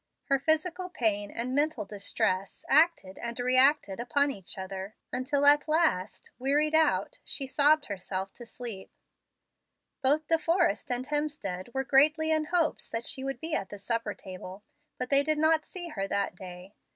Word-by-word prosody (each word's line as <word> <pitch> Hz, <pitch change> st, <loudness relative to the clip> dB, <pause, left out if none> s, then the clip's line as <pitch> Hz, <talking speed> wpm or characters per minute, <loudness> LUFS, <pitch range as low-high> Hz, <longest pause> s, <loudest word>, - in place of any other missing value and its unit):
Her 275 Hz, -1 st, +3 dB
physical 330 Hz, +5 st, 0 dB
pain 205 Hz, -, -1 dB
and 240 Hz, +4 st, -3 dB
mental 290 Hz, -5 st, +1 dB
distress 195 Hz, -1 st, -2 dB
acted 295 Hz, -, +3 dB
and 235 Hz, +1 st, -5 dB
reacted 255 Hz, -4 st, +3 dB
upon 285 Hz, +3 st, +1 dB
each 195 Hz, -7 st, -8 dB
other, 190 Hz, +2 st, -6 dB, 0.2 s
until 275 Hz, +3 st, 0 dB
at 290 Hz, +1 st, +6 dB
last, 305 Hz, -, 0 dB
wearied 295 Hz, +4 st, +1 dB
out, 320 Hz, +10 st, +2 dB
she 275 Hz, -, -2 dB
sobbed 290 Hz, +3 st, +3 dB
herself 190 Hz, -2 st, -5 dB
to 240 Hz, -, -10 dB
sleep. 230 Hz, -6 st, -7 dB, 1.1 s
Both 290 Hz, +4 st, +2 dB
De 325 Hz, +1 st, +2 dB
Forrest 335 Hz, -, +1 dB
and 245 Hz, +1 st, -1 dB
Hemstead 290 Hz, -10 st, -3 dB
were 265 Hz, -, 0 dB
greatly 305 Hz, +4 st, +4 dB
in 310 Hz, -1 st, +2 dB
hopes 335 Hz, -1 st, 0 dB
that 230 Hz, 0 st, -4 dB
she 265 Hz, -4 st, -3 dB
would 270 Hz, 0 st, -4 dB
be 320 Hz, 0 st, -4 dB
at 195 Hz, -11 st, -1 dB
the 205 Hz, -, -8 dB
supper 225 Hz, +1 st, -2 dB
table, 185 Hz, +1 st, -10 dB, 0.3 s
but 250 Hz, +1 st, -4 dB
they 280 Hz, 0 st, +6 dB
did 310 Hz, +1 st, +1 dB
not 315 Hz, 0 st, +2 dB
see 350 Hz, -2 st, -6 dB
her 195 Hz, -9 st, -3 dB
that 200 Hz, -1 st, -1 dB
day. 180 Hz, +1 st, -10 dB
265 Hz, 165 wpm, -29 LUFS, 205-305 Hz, 1.1 s, at